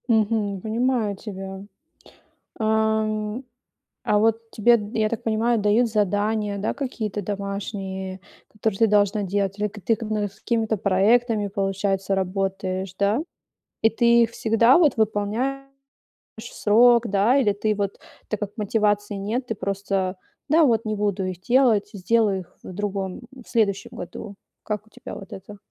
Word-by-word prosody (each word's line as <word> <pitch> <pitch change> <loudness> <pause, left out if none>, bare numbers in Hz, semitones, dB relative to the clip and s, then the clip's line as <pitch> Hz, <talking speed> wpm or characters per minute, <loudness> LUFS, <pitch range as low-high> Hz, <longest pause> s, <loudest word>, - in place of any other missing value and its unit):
Мгм. 215 -3 +1
Понимаю 225 -1 0
тебя. 195 -1 -7 1.0
Ам, 220 +1 0 0.6
а 210 - +3
вот 225 +1 +1
тебе 235 +3 +4
д 210 +2 -6
я 215 -1 +3
так 230 - -4
понимаю, 225 +1 +1
дают 210 +4 +3
задания, 210 0 0
да, 200 - -1
какие-то 220 -7 -4
домашние, 195 -1 -5 0.3
которые 215 -2 -2
ты 225 - +6
должна 205 0 +3
делать, 195 +1 -1
или 210 0 0
к 210 +1 -11
ты 225 - +2
к 230 - -7
с 210 -2 -3
какими-то 225 -2 0
проектами, 210 +3 +2
получается, 195 0 -1
работаешь, 190 0 -2
да? 200 +5 +2 0.6
И 225 - +5
ты 235 0 +4
всегда 230 +3 +4
вот 300 -8 +3
выполняешь 220 +6 0 0.8
в - - -8
срок, 235 +2 +5
да? 205 +7 +3
Или 220 -7 +3
ты 215 +1 0
вот 200 -1 -3 0.3
так, 215 - -2
как 205 -1 -4
мотивации 205 -1 0
нет, 220 +6 -3
ты 225 - -2
просто: 195 -1 -2 0.3
"Да, 320 +3 +5
вот, 230 -4 +2
не 215 0 -1
буду 205 -2 -1
их 185 -1 -5
делать, 235 -3 +3
сделаю 205 0 +1
их 175 - -18
в - - -8
другом 195 0 -3
в 260 -3 -14
следующем 205 -3 0
году". 200 +3 -8 0.3
Как 210 0 -4
у - - -22
тебя 210 - -9
вот 195 - -10
это? 205 +2 -10
210 Hz, 150 wpm, -24 LUFS, 200-225 Hz, 1.0 s, ты